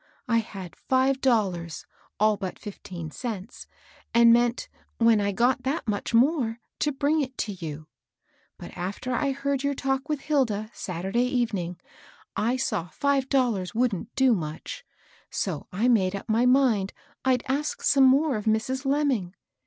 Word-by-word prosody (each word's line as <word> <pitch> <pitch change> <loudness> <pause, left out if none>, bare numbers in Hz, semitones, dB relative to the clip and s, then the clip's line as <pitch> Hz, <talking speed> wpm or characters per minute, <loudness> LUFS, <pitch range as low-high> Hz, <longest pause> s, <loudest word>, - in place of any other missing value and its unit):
I 230 -2 +3
had 195 -6 -7
five 265 +1 +1
dollars, 190 - 0 0.3
all 215 0 +4
but 195 -2 -5
fifteen 175 -6 -8
cents, 220 - -6 0.5
and 235 0 +7
meant, 240 0 +2 0.3
when 230 -2 +4
I 200 0 +1
got 245 +5 +2
that 265 +1 -2
much 205 -1 -2
more, 240 -1 +2 0.2
to 295 - +1
bring 295 +3 +1
it 260 -2 -5
to 215 - -2
you. 160 -5 -7 0.7
But - - -10
after 200 +8 -4
I 275 +3 +1
heard 280 0 -1
your 280 0 0
talk 270 +2 -1
with 300 -2 -1
Hilda, 230 -8 0
Saturday 190 +7 -1
evening, 205 -9 -1 0.6
I 235 +4 +1
saw 215 -9 -1
five 275 - 0
dollars 230 -9 +1
wouldn't 230 -3 -1
do 265 -2 +4
much; 155 -6 -5 0.5
so 175 -7 -3
I 210 +7 +1
made 200 -6 +3
up 200 - -7
my 230 +3 +3
mind 250 -7 +3 0.3
I'd 255 -2 +2
ask 285 +3 -2
some 275 -1 +5
more 275 0 +4
of 210 - -6
Mrs. 230 +5 0
Lemming. 270 -10 0
235 Hz, 155 wpm, -26 LUFS, 200-265 Hz, 0.7 s, and